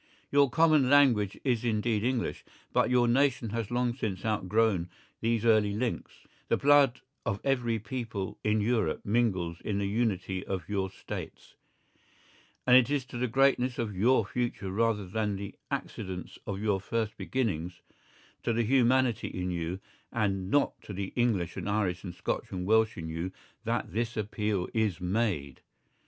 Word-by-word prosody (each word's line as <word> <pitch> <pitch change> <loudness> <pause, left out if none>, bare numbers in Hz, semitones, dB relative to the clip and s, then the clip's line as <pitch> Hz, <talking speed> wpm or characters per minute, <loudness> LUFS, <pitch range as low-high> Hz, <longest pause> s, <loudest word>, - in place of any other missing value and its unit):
Your 140 -1 +5
common 155 -2 +4
language 125 -9 +4
is 125 -4 +1
indeed 110 -2 0
English, 125 -1 -1 0.3
but - - +3
your 125 -1 +4
nation 125 -2 +2
has 115 -2 -2
long 120 0 0
since 100 -7 -4
outgrown 105 -3 +1 0.3
these 115 0 0
early 110 -3 +4
links, 115 +3 -4 0.2
the - - +2
blood 140 -3 +4 0.2
of 100 - -2
every 125 -4 +1
people 115 -4 -5
in 110 0 +2
Europe 110 -7 0
mingles 95 -7 0
in 105 -2 -1
the 100 - 0
unity 100 -3 -1
of 95 -4 -4
your 95 -2 -1
States, - - -8 1.1
and 125 - +6
it 130 -1 +6
is 145 -3 0
to 130 -1 -8
the 125 - +1
greatness 130 0 +2
of 110 -4 -2
your 115 +3 +3
future 120 -4 -3
rather 110 0 +1
than 105 +2 -1
the 100 0 -6 0.2
accidents 95 -3 -5
of 100 -1 -3
your 105 -2 0
first 110 +1 -2
beginnings, 90 -9 -2 0.6
to 115 - 0
the 115 +1 +1
humanity 125 -1 +3
in 90 0 -3
you, 85 +1 -3 0.3
and 95 -4 -1
not 145 +5 +1
to 105 - -8
the 95 0 -4
English 105 -9 +1
and - - -3
Irish 95 -4 0
and 90 -3 -7
Scotch - - -2
and 90 -1 -4
Welsh 110 +2 +3
in 80 -2 -5
you 80 +3 -3 0.3
that - - -2
this 120 +1 -2
appeal 105 -3 -1
is 110 -6 0
made. 90 - -1
110 Hz, 160 wpm, -29 LUFS, 95-120 Hz, 1.1 s, and